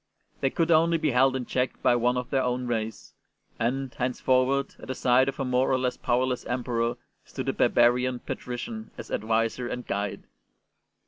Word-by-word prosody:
They 135 - +1
could 165 +4 0
only 165 +1 +4
be 155 -2 0
held 130 +1 +4
in 130 -2 -2
check 125 +1 -1
by 120 - +5
one 125 +1 +2
of 125 +1 -4
their 135 -2 +2
own 125 0 -1
race; 110 -2 -3 0.5
and, 130 +3 -1
henceforward, 130 +1 +1
at - - -11
the 130 - -3
side 130 +2 +3
of 135 - -7
a 135 - 0
more 125 +1 +2
or 130 - +3
less 125 -1 -1
powerless 125 +1 0
Emperor 120 -1 -1 0.3
stood - - -5
a - - 0
barbarian 125 +1 +3
^* - - -34
patrician 220 - -5
'' - - -32
as - - -9
adviser 115 +3 0
and 125 0 -5
guide. 100 0 -3
125 Hz, 190 wpm, -27 LUFS, 120-135 Hz, 0.5 s, by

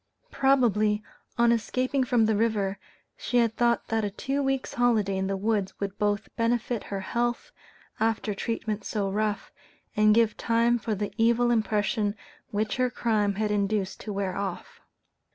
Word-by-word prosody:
Probably, 215 -6 +2 0.3
on 235 0 +4
escaping 255 +4 0
from 240 -3 +3
the 220 0 +2
river, 205 -3 0 0.4
she 245 - -1
had 230 -2 +2
thought 235 -1 +1
that 225 -1 0
a 205 - 0
two 270 +7 -2
weeks' 270 -1 -1
holiday 225 -5 +2
in 190 0 -1
the 195 0 -1
woods 205 -1 -1
would 200 -1 -4
both 205 0 0
benefit 235 0 0
her 195 -1 -4
health, 240 - -2 0.5
after 220 -1 0
treatment 215 0 -3
so 200 -2 -2
rough, 210 +1 -1 0.4
and 215 0 +5
give 230 -2 +3
time 235 +1 +2
for 220 -1 -2
the 205 +1 -4
evil 235 +1 +3
impression 210 -2 +1 0.3
which 215 +2 -1
her 255 0 +2
crime 215 -4 0
had 210 +1 -1
induced 200 -1 -1
to 215 - -6
wear 195 -2 -2
off. 200 0 -5
215 Hz, 160 wpm, -27 LUFS, 205-235 Hz, 0.5 s, and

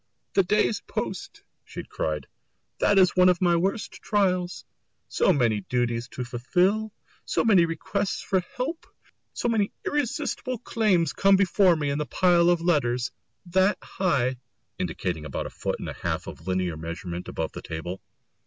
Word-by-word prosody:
"The 195 - +5
day's 210 +3 +1
post!" - - -5 0.2
she - - -8
cried, 75 -3 -3 0.5
"that 205 - +3
is 185 -2 +5
one 185 0 +6
of 180 -1 +2
my 175 -2 +3
worst 195 +6 -1
trials 185 -4 0 0.4
so - - +3
many 115 - +2
duties 120 -1 0
to 125 - -5
fulfil, 180 - +1 0.3
so - - 0
many 195 -7 +6
requests 190 +4 -2
for 190 - +1 0.2
help, 295 +7 -3 0.5
so - - -2
many 220 -4 +1
irresistible 255 -2 -1
claims 200 -9 +1
come 195 0 +5
before 190 -1 +4
me 145 -3 -1
in 140 - -1
the 150 - -2
pile 175 -2 +4
of 175 -1 +3
letters 130 -8 +1 0.3
that 190 +3 +2
high," 130 -9 0 0.4
indicating 85 -4 -2
about 75 - -4
a - - -6
foot - - -3
and - - -6
a - - -4
half - - -3
of - - -10
linear 90 -3 -1
measurement 85 +2 -6
above 80 - -3
the - - -8
table. 85 +4 -6
175 Hz, 160 wpm, -26 LUFS, 120-195 Hz, 0.5 s, one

